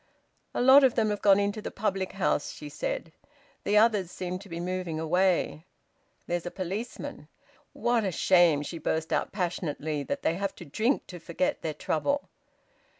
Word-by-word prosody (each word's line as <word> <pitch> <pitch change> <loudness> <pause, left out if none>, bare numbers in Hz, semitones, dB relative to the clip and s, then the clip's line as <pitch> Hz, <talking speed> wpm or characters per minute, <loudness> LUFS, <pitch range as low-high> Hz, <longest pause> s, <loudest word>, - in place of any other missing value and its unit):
"A - - +1
lot 265 +2 +8
of 260 -3 +4
them 220 -2 +2
have 205 - -3
gone 200 -1 +6
into 205 +1 -1
the - - -4
public 195 -3 -2
house," 185 -6 0
she 150 - -9
said. 155 +2 -4 0.5
"The 210 - +2
others 210 -5 +4
seem 180 0 -4
to 200 +1 -13
be 170 0 -5
moving 180 -2 -3
away. 175 0 +1 0.6
There's 175 0 -2
a - - -1
policeman. 195 +6 -5 0.5
What 240 -2 +1
a 190 - 0
shame," 175 -5 +4
she 165 +3 -6
burst 160 +1 -1
out - - 0
passionately, 160 -5 -2
"that 280 - -4
they - - +2
have 195 +2 -3
to 175 - -10
drink 220 - 0
to 180 - -9
forget 170 +3 -1
their 155 -2 -3
trouble!" 280 - -1
185 Hz, 175 wpm, -28 LUFS, 165-205 Hz, 0.6 s, lot